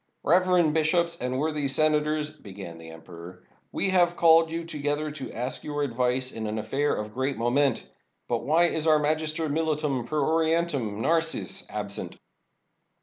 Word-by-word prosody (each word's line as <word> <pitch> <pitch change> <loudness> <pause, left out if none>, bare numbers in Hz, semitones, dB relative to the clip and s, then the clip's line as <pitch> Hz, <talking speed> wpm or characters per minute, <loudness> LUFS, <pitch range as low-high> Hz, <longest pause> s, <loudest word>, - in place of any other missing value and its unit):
"Reverend 180 -2 +3
bishops 170 +2 +1
and 125 +1 -2
worthy 150 0 -1
senators," 150 +1 +1
began 95 - -10
the 80 0 -11
emperor, 85 +2 -12 0.3
"we 195 - +2
have 175 -2 +3
called 165 -1 +5
you 165 +1 -4
together 150 -1 -2
to 145 -3 -7
ask 125 +3 -4
your 145 -1 -2
advice 125 0 0
in 110 -1 -5
an 105 +1 -3
affair 135 +7 -1
of 105 0 -5
great 130 +3 -2
moment. 125 +3 +1 0.4
But 120 - 0
why 170 +4 +4
is 160 0 -2
our 155 -1 +6
Magister 155 +1 -1
Militum 150 -5 -1
per 155 +2 -1
Orientum, 160 -7 0
Narses, 165 +5 -1
absent?" - - -3
150 Hz, 150 wpm, -26 LUFS, 125-160 Hz, 0.4 s, our